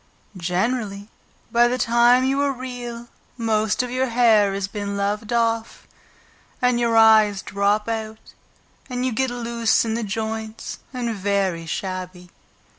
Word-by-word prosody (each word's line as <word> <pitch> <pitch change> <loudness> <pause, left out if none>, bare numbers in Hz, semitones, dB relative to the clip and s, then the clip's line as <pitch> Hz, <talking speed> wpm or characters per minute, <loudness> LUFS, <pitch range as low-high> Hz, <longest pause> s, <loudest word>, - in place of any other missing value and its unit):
Generally, 200 +3 -2 0.4
by 240 +1 +5
the 250 +1 -1
time 240 +1 +4
you 270 +2 +1
are 285 -1 +1
Real, 245 -2 -7 0.3
most 220 0 +1
of 250 - -5
your 260 +1 0
hair 225 -4 +4
has 195 -1 -2
been 200 0 -4
loved 210 +2 -2
off, 230 -1 -1 0.7
and 250 -1 +2
your 230 -1 +2
eyes 215 -3 +5
drop 200 +2 0
out 220 -1 -5 0.6
and 250 0 -2
you 260 - 0
get 260 +3 0
loose 235 -2 0
in 220 - -1
the 230 - -2
joints 220 +1 -5
and 245 -3 -3
very 195 -4 -1
shabby. 185 0 -5
225 Hz, 140 wpm, -22 LUFS, 200-240 Hz, 0.7 s, by